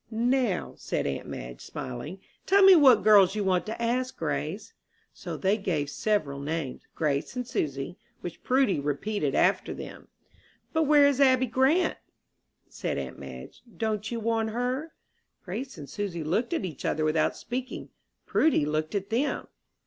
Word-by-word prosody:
"Now," 235 -3 0
said - - -2
aunt 70 -1 -3
Madge, - - -7
smiling, 130 +9 -7 0.3
"tell 395 +1 +5
me 385 -1 +10
what 265 -9 +6
girls 200 -3 +6
you 210 - 0
want 185 +1 +1
to 220 - -5
ask, 250 +2 -1
Grace." 155 +4 -3 0.4
So - - -6
they 195 +2 +2
gave 155 -8 -2
several 155 -11 -1
names 145 -2 -3
Grace 145 - -1
and 250 -1 -3
Susy 140 - -3 0.2
which 175 -2 -7
Prudy 255 - +2
repeated 145 +2 -1
after - - +2
them. - - -9 0.7
"But 320 -2 +2
where 295 -1 +6
is 285 -1 +3
Abby 260 -1 +5
Grant?" 265 +9 +2 0.7
said - - -4
aunt - - -5
Madge. - - -10 0.2
"Don't 215 0 -1
you 235 - -3
want 225 0 0
her?" 250 +7 -2 0.5
Grace 235 +9 -5
and 145 - -8
Susy 190 -5 -4
looked 190 +10 0
at 330 - -1
each 160 -7 -7
other 155 0 0
without 155 0 +1
speaking. 255 +2 -5 0.4
Prudy 300 - +3
looked 155 +4 -2
at 200 +1 -3
them. 255 +6 -1
210 Hz, 155 wpm, -27 LUFS, 155-255 Hz, 0.7 s, me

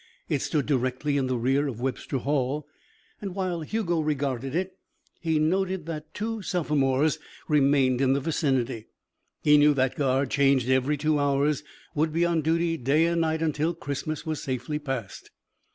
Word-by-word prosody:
It 145 -5 0
stood 145 -4 0
directly 130 +1 0
in 135 -2 +1
the 130 -1 0
rear 135 +5 +1
of 120 -5 -5
Webster 130 +1 -2
Hall, 140 +2 -1 0.6
and 195 -3 -5
while 185 -3 -2
Hugo 175 0 -1
regarded 135 -3 -1
it, 185 +1 -2 0.4
he 160 -2 0
noticed 185 +2 0
that 155 -2 -6
two 225 +1 -3
sophomores 150 -5 +1 0.3
remained 135 -3 +3
in 135 -1 +4
the 140 - +1
vicinity. 130 -7 -1 0.6
He 150 -1 +6
knew 145 0 +5
that 130 -1 +1
guard, 135 -1 +1
changed 135 -3 +3
every 130 +3 +2
two 150 +1 +1
hours, 145 +1 +1 0.3
would 155 +1 +1
be 165 +2 +2
on 170 -2 +1
duty 165 +2 +1
day 145 +5 +2
and 170 0 +1
night 160 0 0
until 160 +2 0
Christmas 145 +2 -4
was 155 -2 -3
safely 135 +1 -3
passed. 135 -9 -5
150 Hz, 165 wpm, -26 LUFS, 135-160 Hz, 0.6 s, He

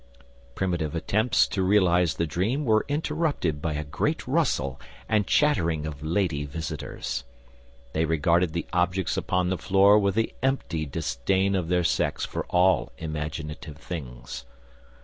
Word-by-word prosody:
Primitive 85 -4 -1
attempts 110 +8 +2
to 95 - -1
realise 90 -3 +3
the 85 - 0
dream 105 - -1
were 110 -2 +3
interrupted 145 - -1
by 80 -1 -1
a 75 +1 -2
great 70 0 -2
rustle 65 -1 0 0.3
and 105 -3 +1
chattering 85 - +2
of 75 -2 -6
lady 80 -2 0
visitors. 70 -3 -5 0.7
They 80 +1 +1
regarded 85 +2 +2
the 85 - -2
objects 90 +1 +1
upon 90 -1 0
the 95 - -1
floor 100 +2 +5
with 100 -1 +1
the 115 0 0
empty 95 - -1
disdain 80 +7 0
of 90 -3 -1
their 90 0 +2
sex 85 - 0
for - - -4
all 90 +1 +3
imaginative 75 -1 -5
things. 60 -8 -7
85 Hz, 140 wpm, -26 LUFS, 75-95 Hz, 0.7 s, floor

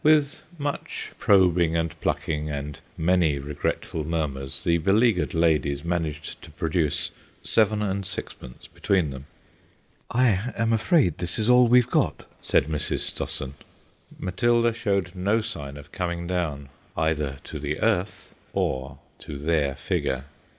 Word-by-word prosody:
With 150 -2 +4 0.2
much 145 -1 -4
probing 90 -4 +4
and 80 -2 -1
plucking 75 -1 -1
and 75 0 -5 0.2
many 85 -3 +3
regretful 75 +2 -3
murmurs 70 -4 -3
the 85 -1 +3
beleaguered 100 +1 +2
ladies 75 -4 +2
managed 80 -3 -3
to - - -12
produce 75 -1 0 0.3
seven 110 -1 +2
and 100 -1 -1
sixpence 90 -9 -6
between 95 -8 0
them. 65 +1 -9 0.8
"I 120 -2 +2
am 115 0 +2
afraid 115 - +3
this 90 0 -1
is 110 +2 +1
all 125 0 +7
we've 125 0 +5
got," - - +1
said - - +2
Mrs. 75 -1 -1
Stossen. 70 -1 -2 0.6
Matilda 115 +5 +2
showed 100 -6 0
no 100 +4 +1
sign 70 -9 -5
of 70 0 -12
coming 85 -2 -3
down 80 -6 -2 0.3
either 75 -4 0
to 75 - -7
the 75 +1 -3
earth 105 -3 0 0.2
or 65 +1 -1 0.2
to 70 - -7
their 75 -2 +1
figure. 65 -1 -1
85 Hz, 135 wpm, -25 LUFS, 75-105 Hz, 0.8 s, all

